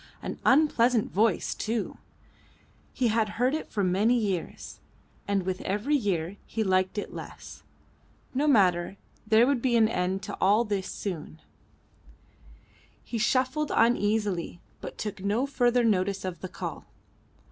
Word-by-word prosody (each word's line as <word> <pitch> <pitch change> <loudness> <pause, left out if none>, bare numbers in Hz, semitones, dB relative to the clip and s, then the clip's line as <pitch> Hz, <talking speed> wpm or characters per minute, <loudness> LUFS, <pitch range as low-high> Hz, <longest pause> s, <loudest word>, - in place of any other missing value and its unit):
An - - -5
unpleasant 250 -6 +3
voice 210 -1 +1
too. 225 0 -3 0.9
He 245 -3 0
had 220 -1 +1
heard 250 +3 +2
it 315 - -3
for 205 - -2
many 200 +7 +3
years, 195 -6 -3 0.5
and 200 -2 +1
with 185 0 -3
every 210 +10 0
year 195 - -1
he 220 - -2
liked 185 0 +1
it 205 - -4
less. - - -9 0.7
No 280 +4 +1
matter; 190 -7 +3 0.3
there 220 +2 +5
would 270 -2 +1
be 245 -1 +1
an 225 -2 +5
end 190 -2 -1
to - - -5
all 205 +4 +4
this 200 -4 -2
soon. 160 - -6 1.6
He 230 - -4
shuffled 260 +6 +1
uneasily, 210 -6 +1 0.2
but - - -8
took 210 -2 -5
no 210 +6 +1
further 245 -3 +2
notice 195 -3 +1
of 185 -2 -5
the 185 - -6
call. - - -6
210 Hz, 140 wpm, -27 LUFS, 190-240 Hz, 1.6 s, there